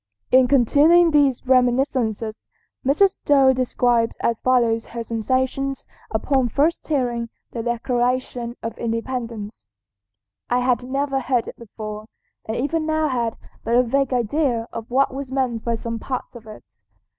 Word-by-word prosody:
In 255 0 +6
continuing 295 +7 +5
these 280 -5 +2
reminiscences 245 -4 +1 0.4
Mrs. 300 +9 +4
Stowe 275 -2 +4
describes 245 -2 +1
as 230 -1 0
follows 235 -3 +2
her 235 0 -5
sensations 260 +4 -1 0.2
upon 255 +3 +1
first 310 +8 0
hearing 240 -6 -1 0.2
the 235 - -4
Declaration 240 0 -1
of 225 -1 -4
Independence: 230 - -4 0.8
"I 245 +1 +2
had 250 -1 +1
never 275 +2 -1
heard 250 -2 0
it - - -7
before, 215 -1 -8 0.4
and 220 - -3
even 310 +5 -1
now 315 -1 +1
had 235 -3 -1 0.3
but 230 +2 0
a 250 - +5
vague 270 +2 0
idea 245 -1 0
of 230 -1 -6
what 265 +2 +2
was 270 -1 -6
meant 255 -4 -1
by 235 -1 0
some 230 0 -5
parts 255 +2 -5
of 230 -2 -12
it. 215 - -11
250 Hz, 145 wpm, -22 LUFS, 230-270 Hz, 0.8 s, In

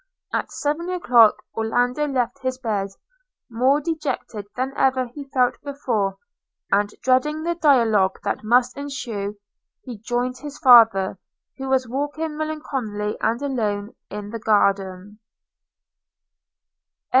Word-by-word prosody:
At - - -2
seven 305 +4 -2
o'clock 245 -12 +4
Orlando 245 +6 0
left 255 -1 -1
his 255 -1 -2
bed, 210 -6 -2 0.6
more 255 +5 +3
dejected 300 -9 -4
than 260 +2 -2
ever 260 -1 +2
he 275 +4 -9
felt 250 -2 +1
before; 240 -9 -2 0.5
and 205 0 +3
dreading 260 +5 +2
the 345 +1 0
dialogue 230 - +3
that - - -2
must 245 +3 +3
ensue, 230 -8 -5 0.5
he 240 -5 -8
joined 245 +3 -2
his 290 +1 -8
father, 225 - +6 0.4
who 265 0 -4
was 260 -1 +2
walking, 290 +5 -3
melancholy 265 -9 -3
and 235 +5 0
alone, 215 -6 -2 0.2
in 205 0 -7
the 230 - -5
garden. 200 -1 0
250 Hz, 120 wpm, -22 LUFS, 210-280 Hz, 0.6 s, father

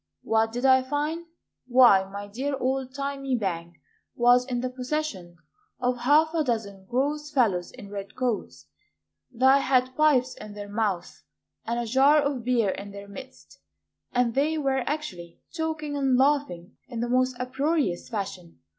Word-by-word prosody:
What 225 0 +1
did 245 +3 -3
I 260 -1 +6
find? 300 +5 -3 0.4
Why, 240 -7 +6
my 200 +1 -7
dear 265 +7 -3
old 260 0 -1
thymy 275 -1 -2
bank 170 -4 -3 0.4
Was 245 +1 +4
in 245 -2 -2
the 255 - -2
possession 250 - -4 0.4
Of 250 0 0
half 305 +6 +4
a 325 -2 +1
dozen 210 -7 -3
gross 290 +4 -1
fellows 210 -11 +1
in 200 - -12
red 200 -1 -7
coats, 250 -4 -3 0.7
Thy 265 +3 +5
had 255 -1 +1
pipes 270 -5 +3
in 210 -1 -10
their 205 0 -7
mouths, 200 -4 -2 0.4
And 235 +1 -1
a 240 - -2
jar 270 +6 +5
of 280 -4 -1
beer 235 -4 +2
in 200 +1 -7
their 200 0 -10
midst, 260 +6 -12 0.5
And 245 -2 +1
they 300 +5 +1
were 270 -3 0
actually 190 - -5 0.2
talking 315 -2 -3
and 270 -3 +2
laughing 265 -11 0
In 240 -2 -6
the 240 - -1
most 255 0 +1
uproarious 270 - -1
fashion. 195 -6 -5
255 Hz, 155 wpm, -26 LUFS, 205-275 Hz, 0.7 s, I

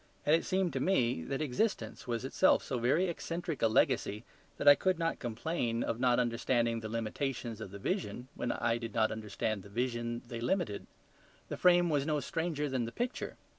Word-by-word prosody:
And 150 - +6
it 165 - 0
seemed 185 -2 +1
to - - -1
me 125 - +2
that 135 +3 -2
existence 145 - -1
was 120 +1 -2
itself 185 +7 +3
so 130 -4 -2
very 140 +10 +3
eccentric 170 -2 -4
a 115 - +5
legacy 110 -1 +2 0.3
that - - -2
I 145 - +12
could 185 +4 +1
not 165 0 -1
complain 120 0 -2
of 115 - -2
not 125 -1 +3
understanding 115 -1 +1
the 110 -1 -6
limitations 115 0 -3
of 110 - -6
the 100 - -8
vision 130 - -3
when 120 - -2
I 115 0 0
did 115 -2 -6
not 110 -1 +3
understand 110 -1 -3
the 100 - -13
vision 120 +1 -2
they 120 -1 -6
limited. 125 - -1 0.6
The - - -3
frame 175 -1 +5
was 145 -1 +1
no 150 -1 +1
stranger 160 -2 -2
than 130 -3 -1
the 115 - -5
picture. 245 - -3
125 Hz, 195 wpm, -32 LUFS, 115-160 Hz, 0.6 s, I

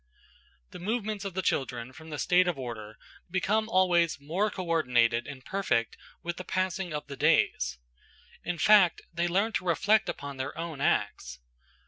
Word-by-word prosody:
The - - -9
movements 210 +1 -2
of 195 -3 -5
the 190 - -1
children 125 -5 -1
from 160 +3 -12
the 150 - -5
state 180 +3 +3
of 175 - 0
order 110 -4 -7 0.3
become 200 +5 0
always 175 -5 +3
more 175 +9 0
co 185 -3 -6
ordinated 120 -8 +2
and 135 -2 -9
perfect 185 - 0 0.3
with 175 0 -4
the 185 - -5
passing 185 0 -2
of 150 -1 -4
the 140 - -8
days; - - +2 0.7
in 175 - -3
fact, 200 -2 +5
they 170 +1 0
learn 195 +6 +1
to - - -1
reflect 200 +5 +3
upon 140 -1 -5
their 130 +2 -4
own 165 -4 -5
acts. 70 - 0
170 Hz, 165 wpm, -29 LUFS, 140-190 Hz, 0.7 s, fact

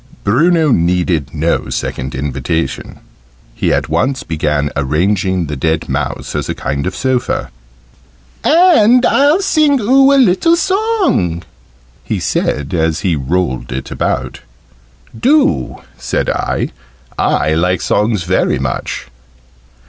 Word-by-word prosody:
Bruno 155 - +3
needed 85 - +1
no 80 +2 -1
second 65 0 -4
invitation: 70 +2 -3 0.5
he - - -1
at - - 0
once 105 - -1
began 75 -2 -1
arranging 90 +6 0
the 75 -1 -5
dead 80 +4 -1
mouse - - -3
as - - -3
a - - -2
kind 70 +4 -3
of 95 - -4
sofa. 130 - -1 0.9
"And 280 - +5
I'll 290 +7 +3
sing 305 -7 +2
oo 270 +5 +4
a 280 - +4
little 260 - +4
song," 375 - 0 0.6
he - - -3
said, 70 +2 -2
as 80 -2 0
he 90 -4 +1
rolled 70 -3 -2
it 65 +1 -5
about. 65 -1 -2 0.8
"Do," 255 - +1 0.2
said - - -1
I: - - -2 0.5
"I 80 - +1
like 90 +3 +1
songs 105 -3 0
very 95 +2 +1
much." 65 -1 -4
90 Hz, 120 wpm, -15 LUFS, -, 0.9 s, And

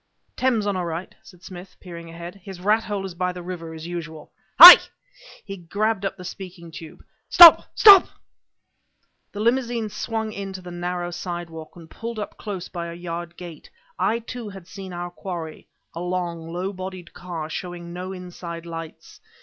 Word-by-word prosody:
"Thames 240 -5 0
on 205 -1 -1
our 180 -2 -3
right," 170 +2 -6
said 180 -2 -18
Smith, 185 0 -12
peering 170 -2 -11
ahead. 170 +1 -9
"His 190 -2 -10
rathole 205 0 -1
is 190 - -7
by 180 +1 -2
the 180 -1 -9
river 170 -2 -7
as 160 0 -9
usual. 160 -3 -8 0.3
Hi!" 350 +4 +14 0.7
he 195 - -7
grabbed 200 +4 -2
up 195 - -4
the 180 - -11
speaking 175 -2 -10
tube 160 0 -12 0.3
"Stop! 345 -2 +9
Stop!" 400 -4 +8 1.2
The 205 - -8
limousine 235 -1 0
swung 220 +1 -4
in 195 -1 -7
to 190 - -8
the 180 - -9
narrow 175 0 -4
sidewalk, 175 -2 -7
and 170 -2 -13
pulled 230 +6 -8
up 210 - -6
close 190 -4 -7
by 170 -2 -6
a 170 - -8
yard 170 0 -7
gate. 170 -4 -11 0.3
I, 230 - +1
too, 235 -1 -8
had 195 -3 -12
seen 190 -1 -10
our 175 0 -6
quarry 170 -4 -8 0.3
a 165 - -7
long, 175 -2 -4
low 185 +3 -4
bodied 185 -2 -9
car, 170 -3 -7
showing 175 +1 -7
no 180 +1 -6
inside 175 -2 -9
lights. 165 -1 -10
180 Hz, 175 wpm, -23 LUFS, 170-195 Hz, 1.2 s, Hi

